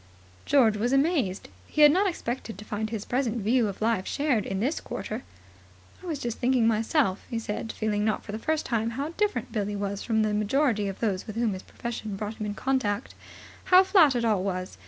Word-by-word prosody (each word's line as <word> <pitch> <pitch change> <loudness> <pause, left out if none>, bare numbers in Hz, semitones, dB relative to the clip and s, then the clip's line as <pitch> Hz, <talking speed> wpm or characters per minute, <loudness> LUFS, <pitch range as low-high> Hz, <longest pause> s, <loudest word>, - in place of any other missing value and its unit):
George 230 -7 +4
was 235 +4 0
amazed. 275 - +1 0.2
He 305 - +3
had 295 - +9
not 385 +5 +3
expected 240 - -5
to 210 - -10
find 215 +1 -3
his 220 -2 -4
present 245 -2 0
view 230 +2 +2
of 200 +1 -5
life 220 -4 +1
shared 280 -8 0
in 190 - -2
this 265 +9 -1
quarter. - - -5 0.8
"I 370 - -10
was 320 -4 -2
just 240 -4 -4
thinking 250 -2 +3
myself," 225 - +1
he 230 - -2
said, 225 0 -4
feeling 210 -1 -1
not 215 0 0
for 205 - -7
the 215 - -4
first 310 +5 -1
time 230 -2 0
how 285 +3 -2
different 415 +5 -1
Billie 205 -2 -2
was 200 0 -3
from 220 -2 +1
the 215 -1 0
majority 215 0 +1
of 195 - -6
those 200 -5 -1
with 215 - -6
whom 230 -3 +1
his 185 - -6
profession 225 -3 -6
brought 210 +2 -5
him 210 - -1
in 205 - -4
contact, 255 -5 -1 0.5
"how 370 0 +7
flat 345 -9 +5
it 235 -1 0
all 210 -4 +2
was. 185 -1 -4
225 Hz, 215 wpm, -27 LUFS, 210-265 Hz, 0.8 s, had